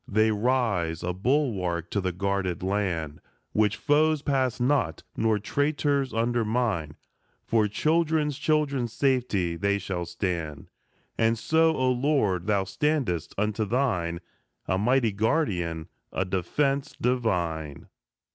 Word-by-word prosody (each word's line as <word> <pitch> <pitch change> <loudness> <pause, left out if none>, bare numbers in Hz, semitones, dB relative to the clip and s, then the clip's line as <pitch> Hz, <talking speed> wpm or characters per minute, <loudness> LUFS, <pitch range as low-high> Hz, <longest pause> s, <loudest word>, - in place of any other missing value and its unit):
They 110 +1 +3
rise, 105 -8 0
a 90 0 -1
bulwark 95 - 0
to 100 - 0
the 95 -1 -1
guarded 95 -1 -2
land, 90 -6 -2 0.3
Which 105 -1 +2
foes 150 0 +2
pass 130 -4 0
not, 130 +2 +1
nor 110 -1 +2
traitors 145 +4 0
undermine; 115 -8 0 0.5
For 110 -2 +2
children's 155 +4 +1
children's 140 -6 0
safety 120 -11 +1
they 100 +2 +1
shall 90 -3 -4
stand; 85 -7 -4 0.5
And 115 0 +3
so, 160 +6 +3
O 130 0 +2
Lord, 120 - +1
thou 100 -2 +2
standest 130 - -1
unto 105 +2 0
thine, 95 -8 0 0.5
A 95 - +1
mighty 120 +1 +2
guardian, 100 - 0 0.2
a 95 - -1
defence 135 +10 -1
divine. 85 - -1
110 Hz, 120 wpm, -26 LUFS, 90-135 Hz, 0.5 s, They